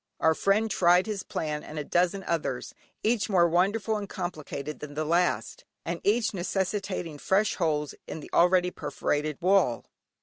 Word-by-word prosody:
Our 160 - +4
friend 210 +6 +1
tried 180 0 +4
his 210 -3 -3
plan 150 -3 -3
and 155 - -9
a 150 - -2
dozen 180 +5 +1
others, 155 -8 -2 0.3
each 220 -1 +1
more 175 -4 +5
wonderful 200 +6 +1
and 205 -1 -6
complicated 155 -5 -5
than 145 -1 -8
the 155 +1 -1
last, 180 - 0 0.2
and - - -3
each 220 +2 +2
necessitating 185 -3 -2
fresh 200 +6 +2
holes 150 -4 0
in - - -5
the - - -11
already 180 +1 +4
perforated 150 -1 -2
wall. 185 -11 +3
180 Hz, 160 wpm, -28 LUFS, 155-200 Hz, 0.3 s, more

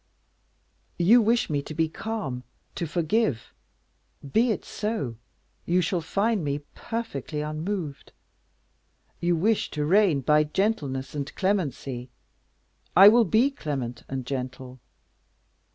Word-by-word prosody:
You 215 +8 +6
wish 230 +2 +2
me 145 -2 -1
to 155 - -8
be 160 +1 +2
calm, 160 - -4 0.3
to 170 - -3
forgive? 165 - 0 0.8
be 240 +3 +4
it 220 - -2
so, 180 - -3 0.5
you 175 +2 +3
shall 175 +1 0
find 200 +4 0
me 145 0 -2
perfectly 165 - -4
unmoved. 155 0 -4 1.1
You 175 0 +2
wish 210 +6 +1
to 150 -1 -2
reign 180 -4 +4
by 150 +3 +4
gentleness 150 -7 -1
and 145 -1 -4
clemency? 140 -10 -1 0.9
I 195 +2 +10
will 235 +1 +5
be 230 +9 +3
clement 135 - -4
and 130 -2 -4
gentle. 130 -1 -5
160 Hz, 120 wpm, -26 LUFS, 140-210 Hz, 1.1 s, I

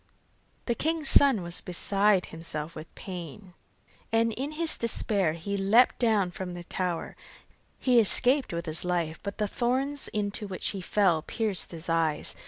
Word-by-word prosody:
The 240 - +1
king's 315 +3 0
son 265 -9 +5
was 170 0 -2
beside 195 +2 +2
himself 160 -1 -5
with 155 0 -9
pain, 180 +1 -8 0.6
and 225 0 +2
in 275 +6 -4
his 325 +1 0
despair 200 -7 +1
he 175 +5 -4
leapt 200 +6 +4
down 215 -6 +2
from 180 0 -6
the 175 - -7
tower. 180 -1 -3 0.6
He 250 -2 +4
escaped 255 +5 +3
with 170 0 -4
his 155 0 -4
life, 170 -3 -1
but 200 -1 -6
the 210 -1 0
thorns 265 +6 0
into 210 0 -2
which 190 -2 -2
he 195 - -4
fell 180 -4 +2
pierced 210 +2 -2
his 165 -1 -8
eyes. 165 -2 0
195 Hz, 160 wpm, -28 LUFS, 170-230 Hz, 0.6 s, son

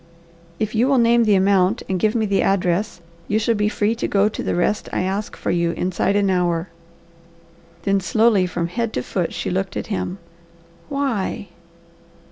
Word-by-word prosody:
"If 215 -1 -2
you 230 +3 +2
will 275 -1 +3
name 235 0 +4
the 210 -2 +4
amount 195 +2 +2
and 185 -1 -1
give 215 +4 +1
me 220 -2 +1
the 200 -1 +1
address, 185 0 0 0.3
you 210 - +1
shall 225 +1 +1
be 210 -1 +1
free 210 +1 0
to - - -1
go 200 +1 +2
to - - -6
the - - -1
rest 190 +4 0
I - - -1
ask 195 +3 -3
for - - -2
you 170 -1 +1
inside 185 +2 0
an 200 -1 +2
hour." 175 -1 0 1.1
Then 195 0 +2
slowly 215 -1 +3
from 175 -1 -2
head 230 +4 -2
to 125 - -2
foot 175 +3 -2
she - - -3
looked 190 +1 -2
at - - -3
him. 185 -1 -3 0.7
"Why?" 260 -8 -2
200 Hz, 185 wpm, -21 LUFS, 185-220 Hz, 1.1 s, name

